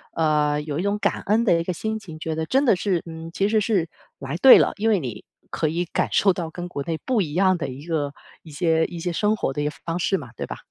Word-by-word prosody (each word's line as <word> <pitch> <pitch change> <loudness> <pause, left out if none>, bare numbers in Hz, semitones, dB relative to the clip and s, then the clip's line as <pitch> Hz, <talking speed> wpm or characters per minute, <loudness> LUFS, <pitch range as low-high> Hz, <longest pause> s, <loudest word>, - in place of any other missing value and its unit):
呃， 150 -2 +2
有 150 -1 -4
一 170 - -1
种 200 +1 0
感 200 - 0
恩 220 +3 +2
的 170 -7 +3
一 - - -1
个 180 +1 -2
心 220 +5 -3
情， 165 -6 -11
觉 160 0 -3
得 160 - -2
真 270 - +2
的 235 - +5
是 180 -2 0
嗯， 165 0 -8
其 200 +3 +1
实 220 -1 +3
是 195 -7 0 0.3
来 140 +4 -4
对 260 +8 +9
了， - - +2
因 220 +2 +1
为 205 -4 +3
你 120 -7 -6 0.2
可 155 - -1
以 170 +3 -1
感 - - -1
受 195 -2 +4
到 170 -2 -4
跟 175 +2 -6
国 140 -5 -5
内 160 +1 -3
不 250 -5 +2
一 155 -5 -3
样 185 +1 +3
的 160 - -3
一 135 +4 -9
个 145 -4 -1 0.3
一 160 - -13
些 160 +1 +1
一 170 -1 -7
些 175 +1 -2
生 210 +5 +1
活 135 - -2
的 145 - -3
一 - - -1
个 150 - -1
方 165 +1 -2
式 195 +2 +1
嘛， 125 -6 -9
对 - - -4
吧？ - - -7
170 Hz, 305 characters per minute, -23 LUFS, 155-200 Hz, 0.3 s, 对